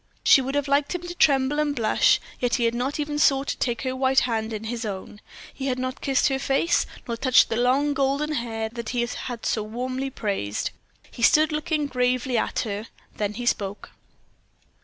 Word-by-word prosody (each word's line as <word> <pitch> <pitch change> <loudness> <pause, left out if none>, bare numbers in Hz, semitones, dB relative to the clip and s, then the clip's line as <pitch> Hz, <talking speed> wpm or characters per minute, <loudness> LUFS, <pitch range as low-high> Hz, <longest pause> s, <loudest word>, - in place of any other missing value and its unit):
She 270 - +7
would 270 +2 -3
have 285 0 0
liked 280 +4 +1
him 355 - -4
to 350 0 -6
tremble 280 -3 +3
and 295 -1 0
blush, 230 -4 +3 0.2
yet 245 -1 +1
he 245 - 0
had 230 0 +2
not 255 +5 -2
even 295 0 -2
sought 275 -2 +3
to - - -2
take 240 0 -1
her 260 -1 -2
white 265 0 +3
hand 225 -2 -1
in 215 -1 -5
his 230 +1 -4
own. 205 0 -6 0.3
He 270 0 -4
had 255 -1 0
not 255 +1 -4
kissed 270 -2 +2
her 270 0 -1
face, 275 +5 +1 0.2
nor 235 - -2
touched 255 +2 +4
the 225 - -1
long, 260 +5 +2
golden 280 +2 0
hair 225 -4 -2
that 235 -1 -6
he - - +3
had 240 0 -6
so 220 - 0
warmly 255 +5 -3
praised. 195 - -3 0.4
He - - -10
stood 310 +5 +5
looking 305 0 -1
gravely 250 -1 0
at 225 - 0
her; 210 -1 -4 0.3
then 210 0 -2
he 245 +2 -5
spoke. 205 -3 -2
255 Hz, 200 wpm, -24 LUFS, 230-280 Hz, 0.4 s, She